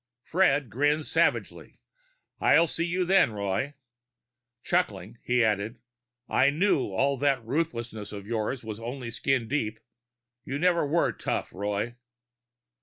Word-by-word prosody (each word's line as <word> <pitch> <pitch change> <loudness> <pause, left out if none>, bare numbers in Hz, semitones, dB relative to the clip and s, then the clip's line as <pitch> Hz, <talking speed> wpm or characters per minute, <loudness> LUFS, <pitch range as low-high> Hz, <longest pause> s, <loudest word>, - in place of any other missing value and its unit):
Fred 145 - +2
grinned 145 +6 +1
savagely. - - 0 0.6
"I'll 165 - +5
see 165 +1 -1
you 180 +1 0
then, 185 - +4
Roy." 100 +8 -2 0.9
Chuckling, 120 - -1
he 125 -1 +2
added, 105 +1 -1 0.5
"I - - +4
knew 155 0 +2
all 135 +8 +1
that 135 -3 +1
ruthlessness 115 -7 -3
of 100 -2 -7
yours 115 +3 -2
was 110 -1 -6
just 120 0 -6
skin 135 -4 +1
deep. 110 -5 -2 0.6
You 135 - -4
never 170 -1 +2
were 170 +4 +2
tough, - - -3
Roy." 105 +4 -3
130 Hz, 125 wpm, -27 LUFS, 110-150 Hz, 0.9 s, I'll